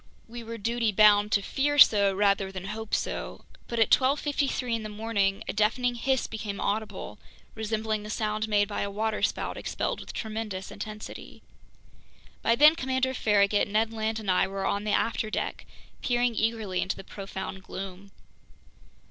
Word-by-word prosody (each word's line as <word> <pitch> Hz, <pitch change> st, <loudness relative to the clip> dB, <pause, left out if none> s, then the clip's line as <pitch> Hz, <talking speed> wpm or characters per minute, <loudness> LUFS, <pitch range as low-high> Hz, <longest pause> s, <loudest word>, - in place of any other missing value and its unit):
We 235 Hz, +1 st, -8 dB
were 230 Hz, 0 st, -6 dB
duty 230 Hz, +1 st, 0 dB
bound 210 Hz, 0 st, +5 dB
to 200 Hz, -, +3 dB
fear 290 Hz, +7 st, 0 dB
so 200 Hz, -7 st, +7 dB
rather 195 Hz, 0 st, +2 dB
than 185 Hz, -1 st, -7 dB
hope 215 Hz, +2 st, -3 dB
so. -, -, -4 dB, 0.2 s
But 235 Hz, -, -4 dB
at 225 Hz, -, +3 dB
12:53 275 Hz, -3 st, +2 dB
in -, -, -7 dB
the 215 Hz, -, -6 dB
morning, 205 Hz, -2 st, -1 dB
a -, -, -2 dB
deafening 230 Hz, +4 st, +1 dB
hiss 260 Hz, +2 st, 0 dB
became 215 Hz, -2 st, -5 dB
audible, 215 Hz, +1 st, -3 dB, 0.3 s
resembling 220 Hz, 0 st, -2 dB
the 210 Hz, -, -8 dB
sound 215 Hz, 0 st, -1 dB
made 205 Hz, -1 st, +3 dB
by 205 Hz, -, -3 dB
a 200 Hz, -, -1 dB
waterspout 215 Hz, +2 st, -1 dB
expelled -, -, -3 dB
with -, -, -8 dB
tremendous 215 Hz, -4 st, -5 dB
intensity. 215 Hz, 0 st, -8 dB, 1.0 s
By 230 Hz, -, +3 dB
then 300 Hz, +5 st, +8 dB
Commander 260 Hz, -3 st, 0 dB
Farragut, 205 Hz, -3 st, +3 dB
Ned 220 Hz, +2 st, +1 dB
Land, 220 Hz, 0 st, -2 dB
and 205 Hz, -3 st, -1 dB
I 185 Hz, +1 st, +3 dB
were 195 Hz, 0 st, -4 dB
on 205 Hz, +2 st, -1 dB
the 210 Hz, -, 0 dB
afterdeck, 215 Hz, 0 st, -1 dB, 0.3 s
peering 245 Hz, -1 st, +1 dB
eagerly 220 Hz, -4 st, -1 dB
into -, -, -1 dB
the -, -, -9 dB
profound 190 Hz, -1 st, -7 dB
gloom. 190 Hz, +1 st, -8 dB
215 Hz, 160 wpm, -27 LUFS, 200-230 Hz, 1.0 s, then